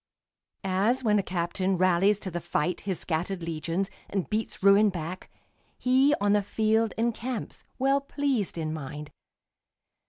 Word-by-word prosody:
As 200 +7 +1
when 210 -2 +3
a - - +2
captain 185 +1 -1
rallies 185 +3 +3
to 190 - -4
the 175 - -3
fight 170 +1 -1
His 185 - 0
scattered 175 +2 -2
legions, 165 +3 -2 0.2
and 195 -3 -2
beats 215 -2 -2
ruin 200 +2 +6
back, 175 0 -6 0.5
He, 265 +3 +4
on 205 0 +2
the 210 - +4
field, 220 +2 +1
encamps, 235 +1 -3
well 275 +2 +2
pleased 275 -9 -1
in 155 -1 -2
mind. 150 0 -7
195 Hz, 145 wpm, -27 LUFS, 175-220 Hz, 0.5 s, ruin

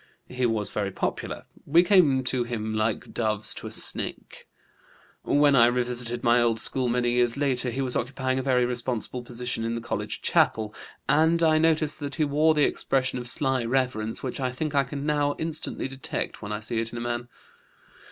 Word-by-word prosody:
He 125 -1 0
was 110 -3 +1
very 100 -2 -1
popular; 95 - -4 0.2
we 165 +4 +4
came 170 -9 +4
to 125 -1 0
him 110 -2 -4
like 110 0 -1
doves 110 -2 -1
to - - -7
a - - -7
snake. - - -5 0.7
When 145 -1 +3
I 120 -2 +7
revisited 120 -1 -2
my 120 +1 +4
old 115 -1 +2
school 130 +2 0
many 120 0 +1
years 120 0 +2
later 130 -3 +1
he 130 +3 -3
was 125 -2 -1
occupying 130 +1 -1
a - - 0
very 125 -2 +2
responsible 125 0 -1
position 120 -1 -4
in 115 +1 -2
the - - -2
college 120 0 -4
chapel, 110 -1 +2 0.3
and 165 +2 +3
I 155 -1 +4
noticed 155 -2 +2
that 145 -2 -5
he 155 - +1
wore 155 +2 +3
that 150 - +4
expression 130 -1 -1
of 120 -1 0
sly 135 -1 0
reverence 115 -3 -1
which 130 0 -4
I 130 -1 -1
think 150 +4 -3
I 140 -1 +3
can 140 +2 -5
now 145 -1 +1
instantly 160 -4 -3
detect 135 0 -5
when 105 0 -6
I 105 0 -3
see 115 +1 -1
it 115 0 -3
in 120 - -7
a - - -4
man. 120 0 -3
125 Hz, 195 wpm, -26 LUFS, 120-140 Hz, 0.7 s, I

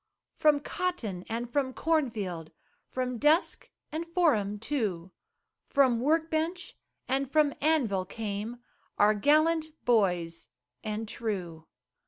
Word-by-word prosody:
From 300 -2 +4
cotton 255 - -3
and 235 +2 -2
from 270 -3 0
corn 315 -4 +2
field, 180 -8 -5 0.4
From 250 -2 -3
desk 305 +5 +2 0.2
and 325 +2 -4
forum 290 - +2
too, 205 -8 -2 0.6
From 260 -4 +3
work 320 +5 +1
bench 330 +4 -2 0.3
and 265 +1 0
from 300 -2 +3
anvil, 245 -12 +2
came 220 +4 -5 0.3
Our 210 +1 +5
gallant 310 +8 +3 0.2
boys 175 - +1 0.3
and 215 +1 -3
true. 180 -8 -4
240 Hz, 115 wpm, -29 LUFS, 205-305 Hz, 0.6 s, Our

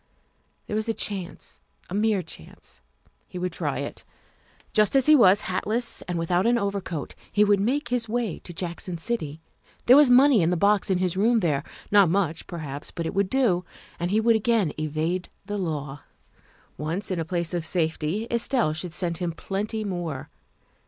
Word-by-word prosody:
There 210 - -4
was 220 +1 0
a 225 - 0
chance, 190 -4 -3 0.3
a - - -8
mere 210 -2 +1
chance. 80 - -10 0.5
He - - -8
would 180 0 -2
try - - -2
it. - - -5 0.7
Just 215 +3 +3
as 270 -2 +4
he 305 - +7
was, 205 -6 +6
hatless 220 +6 -1
and 175 -1 -2
without 175 +4 +1
an 240 0 +4
overcoat, 200 -7 -3 0.2
he 210 - +4
would 205 -1 +4
make 275 +9 0
his 240 -2 -1
way 230 -6 -2
to - - -9
Jackson 175 +1 -4
City. 160 -6 -3 0.4
There 250 - +8
was 290 -2 +7
money 255 -2 +6
in 165 - +2
the 180 - +1
box 200 +3 +3
in 190 - +2
his 185 -1 0
room 225 +5 +3
there. 155 -9 +1 0.3
Not 200 -4 +6
much, 170 -3 0
perhaps, 145 -4 -6
but 170 - -5
it - - -3
would 195 -1 +1
do, 230 -10 +2 0.4
and 175 +1 -1
he 210 +3 +2
would 230 +1 +4
again 220 -7 +1
evade 155 +4 -2 0.2
the 205 0 -3
law. 145 -5 -4 0.8
Once 165 +7 -3
in 180 - -1
a - - 0
place 170 +1 -2
of 175 -2 -1
safety, 160 +4 -1
Estelle 235 - +1
should 160 +1 -4
send 170 -2 -2
him 175 -2 -1
plenty 205 +5 -3
more. 175 -8 -4
185 Hz, 185 wpm, -25 LUFS, 165-220 Hz, 0.8 s, There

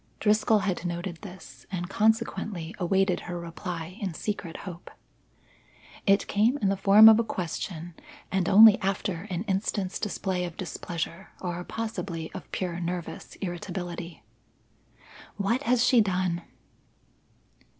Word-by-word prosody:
Driscoll 215 0 +3
had 185 -3 -1
noted 175 0 -4
this, 165 -10 -12
and 180 -2 -3
consequently 210 -4 0
awaited 190 0 +2
her 175 0 -6
reply 170 +2 -6
in 190 -5 -3
secret 190 -5 -4
hope. 175 -2 -8 1.2
It 195 0 +4
came 225 +7 +2
in 205 -7 +1
the 195 - +2
form 200 +3 +8
of 220 0 +8
a - - +3
question 175 -3 -4 0.4
and 190 -2 +1
only 215 +1 +8
after 195 -1 -2
an 180 0 -2
instant's 195 -2 -1
display 190 -3 -2
of 175 -2 -6
displeasure 170 0 -5
or 175 -1 -4
possibly 190 -7 -4
of 190 - -9
pure 180 -2 -3
nervous 175 0 -5
irritability. 175 -2 -5 1.1
"What 220 +6 +1
has 245 -1 +4
she 245 -4 +6
done?" 185 -3 0
185 Hz, 130 wpm, -27 LUFS, 175-205 Hz, 1.2 s, form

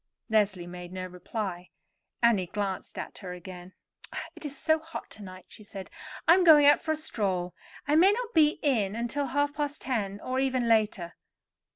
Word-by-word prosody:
Leslie 200 -5 +2
made 175 0 -9
no 185 0 -5
reply. 180 0 -5 0.5
Annie 210 -6 +4
glanced 200 0 -4
at - - -6
her 180 -3 -7
again. 180 +1 -10 0.6
"It - - -12
is 280 -1 -7
so 315 0 +2
hot 320 +1 -9
to 215 - -10
night," 185 -1 -10
she 215 - -13
said. 200 -2 -8 0.4
"I 330 - +9
am 370 +1 +4
going 305 -4 +8
out 290 - +6
for 315 - 0
a - - -1
stroll. 190 - -2 0.3
I 295 - +3
may 365 +5 +7
not 475 +2 -3
be 310 -2 +4
in 220 -9 +1
until 240 +5 -1
half 285 +2 0
past 290 -1 -3
ten, 205 -6 -2
or 255 +1 -2
even 260 -2 +1
later. 210 -6 +1
220 Hz, 185 wpm, -28 LUFS, 185-290 Hz, 0.6 s, I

